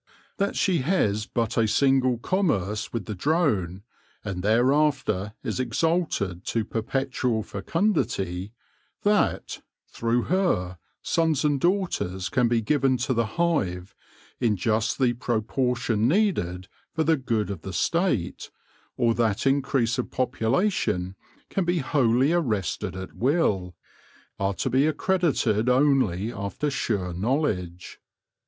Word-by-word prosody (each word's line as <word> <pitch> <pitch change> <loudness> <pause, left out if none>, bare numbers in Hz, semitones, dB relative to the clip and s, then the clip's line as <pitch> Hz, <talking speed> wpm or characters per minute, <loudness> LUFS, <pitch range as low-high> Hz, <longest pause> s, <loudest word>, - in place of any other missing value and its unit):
That 200 -1 0
she 185 -3 +2
has 110 - +1
but 115 -2 -2
a 110 - +3
single 130 +1 +3
commerce 115 - -1
with 115 -5 -4
the 105 - -4
drone, 100 - 0 0.4
and 95 -3 -3
thereafter 120 -2 +1
is 115 -2 -3
exalted 125 - 0
to 115 -2 -1
perpetual 125 0 -1
fecundity; 100 - -1 0.5
that, 205 0 +1 0.3
through 115 +1 0
her, 115 - 0 0.2
sons 160 -3 +1
and 145 -2 +2
daughters 170 - 0
can 125 +3 +2
be 115 -1 +1
given 135 +1 +2
to 130 +1 -1
the 115 -2 +1
hive 100 - 0 0.5
in 115 -3 +2
just 110 +3 0
the 125 -3 +2
proportion 120 -1 0
needed 130 - 0 0.2
for 160 - 0
the 160 +1 +3
good 115 - -1
of 95 -5 -6
the 95 - -6
State, 125 - 0 0.5
or 115 -1 +3
that 115 -2 0
increase 135 -4 +1
of - - -2
population 115 - 0 0.3
can 195 - -1
be 175 +1 0
wholly 135 -1 +2
arrested 110 - -1
at 95 -1 -7
will, 110 - 0 0.6
are 100 0 0
to 130 - -1
be 135 +4 +3
accredited 150 - +1
only 125 -7 +2
after 100 +9 -3
sure 100 -9 -2
knowledge. 90 - -2
120 Hz, 125 wpm, -25 LUFS, 100-145 Hz, 0.6 s, a